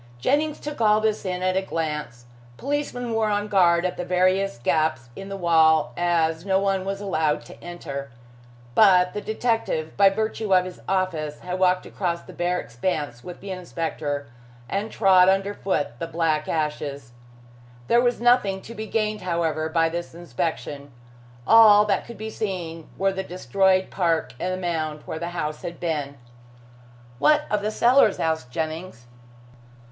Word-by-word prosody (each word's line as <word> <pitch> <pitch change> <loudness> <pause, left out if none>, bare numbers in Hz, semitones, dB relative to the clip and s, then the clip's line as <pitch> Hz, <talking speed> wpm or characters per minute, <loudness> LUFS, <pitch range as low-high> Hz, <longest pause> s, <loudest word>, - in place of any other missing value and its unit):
Jennings 295 - 0
took 295 -4 -6
all 215 -1 +5
this 215 -1 -1
in 180 -1 -2
at 185 0 +1
a 190 - +2
glance. 150 -9 -4 0.3
Policemen 265 -4 -3
were 225 -1 +1
on 205 0 0
guard 175 -4 +3
at 180 - -2
the 180 - -3
various 185 -2 +1
gaps 140 -1 0
in 195 0 -8
the 195 - -5
wall, 160 -6 +3
as 165 -2 +1
no 190 -1 +2
one 195 -1 0
was 195 0 -3
allowed 160 -7 0
to - - -14
enter. 140 -6 -6 0.6
But 185 - +5
the 210 - -4
detective, 220 -9 -1
by 200 0 +7
virtue 215 0 0
of 180 0 +3
his 185 -1 -9
office, 170 -6 -1
walked 185 0 +1
across 170 -3 -3
the - - -12
bare 180 +1 -1
expanse 120 -1 -3
with 180 - -9
the 195 0 -7
inspector, 160 -5 -4 0.4
and 200 - -3
trod 190 -3 +5
under 195 +1 +1
foot 145 - -2
the 165 - -3
black 160 -2 0
ashes. 150 -5 -3 0.8
There 235 - +4
was 245 -1 +1
nothing 235 -6 +2
to 230 - -9
be 220 -1 -6
gained, 215 -2 -1
however, 165 -3 -1
by 165 0 +2
this 170 0 -5
inspection. 145 -2 -4 0.5
All 210 0 +7
that 200 -3 0
could 235 - -9
be 220 +1 -6
seen 175 -7 -5
were 195 0 +1
the 190 - -3
destroyed 185 +2 +1
park 170 -3 0
and 185 - -2
the 185 - -2
mound 155 -4 -3
where 160 - -5
the 170 +1 -4
house 150 -1 -3
had 170 0 -7
been. 150 -5 -3 1.0
"What 300 - +4
of 210 -1 +1
the 210 - -1
cellars?" 240 0 +4
asked 160 -6 -1
Jennings. 155 -2 -5
180 Hz, 165 wpm, -24 LUFS, 160-200 Hz, 1.0 s, by